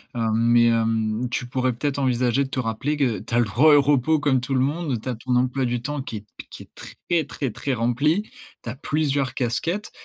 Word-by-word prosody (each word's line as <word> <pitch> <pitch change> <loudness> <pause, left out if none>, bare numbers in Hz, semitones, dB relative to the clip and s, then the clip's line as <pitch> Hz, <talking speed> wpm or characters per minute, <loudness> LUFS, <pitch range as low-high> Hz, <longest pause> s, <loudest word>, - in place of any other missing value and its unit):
hem, 115 -2 0
mais 120 +1 +4
hem, 115 0 0
tu 125 - -3
pourrais 130 0 -1
peut-être 140 +3 -2
envisager 125 0 +1
de 130 - -9
te 130 - -2
rappeler 125 +6 -2
que 130 -7 0
tu 115 - -9
as - - +4
le 120 - +3
droit 140 +9 +4
au 145 - +6
repos 145 +2 +2
comme 140 -3 +2
tout 130 +2 -4
le 130 - +2
monde. 145 -4 -1
Tu 130 - -5
as 125 - -2
ton 125 +2 -2
emploi 130 +1 +1
du 120 -1 -2
temps 145 +2 -4
qui 115 -4 -6
est 105 - -11 0.2
qui - - -10
est - - -22
très, 170 -3 -3
très, 135 -2 -4
très 135 +5 -3
rempli, 135 - +1 0.4
tu - - -5
as 120 - -5
plusieurs 140 -1 -1
casquettes 165 - -2
130 Hz, 235 wpm, -23 LUFS, 120-145 Hz, 0.4 s, au